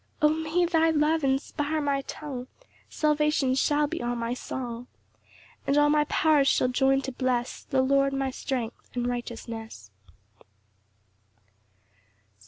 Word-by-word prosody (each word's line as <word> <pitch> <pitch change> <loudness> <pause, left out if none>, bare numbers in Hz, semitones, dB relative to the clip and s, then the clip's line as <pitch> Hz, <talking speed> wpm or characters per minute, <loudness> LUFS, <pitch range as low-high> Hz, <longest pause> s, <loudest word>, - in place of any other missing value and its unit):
8 - - +3
O - - +7
may 320 +3 +1
thy 325 -1 +3
love 315 0 +2
inspire 285 +3 0
my 280 -2 0
tongue! 270 -3 -7 0.4
Salvation 300 -3 +1
shall 290 +2 +2
be 290 - -4
all 240 0 -1
my 235 0 -2
song; 245 -1 -6 0.8
And 280 - +2
all 295 0 +5
my 300 0 +3
powers 300 -2 +3
shall 255 - +3
join 270 +1 +2
to 265 - -4
bless 250 -1 -2
The 260 -1 +1
Lord, 275 +1 +3
my 270 -1 -1
strength 250 -3 -4
and 245 -1 -1
righteousness. 225 - -6
275 Hz, 135 wpm, -27 LUFS, 245-300 Hz, 0.8 s, O